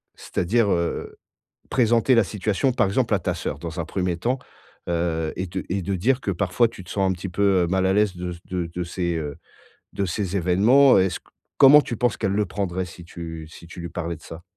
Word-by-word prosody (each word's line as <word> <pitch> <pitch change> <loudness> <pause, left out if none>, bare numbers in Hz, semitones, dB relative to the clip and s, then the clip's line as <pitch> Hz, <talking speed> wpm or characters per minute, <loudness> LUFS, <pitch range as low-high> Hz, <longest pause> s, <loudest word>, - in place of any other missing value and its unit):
c'est-à-dire, 105 +3 0
heu, 85 -1 -2 0.5
présenter 120 0 +3
la 115 - +5
situation 105 +6 0
par - - +2
exemple, 115 +3 +1
à - - 0
ta - - -1
sœur - - -4
dans 85 +1 -6
un 85 - -2
1er 90 -1 -2
temps, 125 +8 -1 0.5
heu, 85 -2 -1
et 95 - -2
de 95 +2 -4
et 95 +2 -1
de 95 +2 -2
dire 125 +9 +1
que 100 - -1
parfois 100 +6 +2
tu 95 - -11
te 90 - -15
sens 95 -2 +1
un - - +1
petit 90 +1 -6
peu, 95 0 +2
heu, - - 0
mal 95 +1 +1
à 95 - +3
l'aise 105 -2 +2
de 90 0 -4
ce 85 - -12
de 90 -2 -3
de 90 - -2
ces, 85 0 -2
heu, 75 -3 -5 0.6
de 100 - -1
ces 95 +1 -2
événements? 105 +10 +5
Est-ce 95 -2 +1
q - - -51 0.3
comment 145 +2 +9
tu 120 - -5
penses 120 -1 +1
qu'elle 95 - 0
le 105 +1 +1
prendrait 95 -1 -2
si 85 0 -12
tu 80 -2 -8
si 85 +1 -13
tu 85 - -9
lui 85 - -5
parlais 85 -1 -4
de 80 - -20
ça? 80 +1 -10
95 Hz, 235 wpm, -23 LUFS, 85-105 Hz, 0.6 s, comment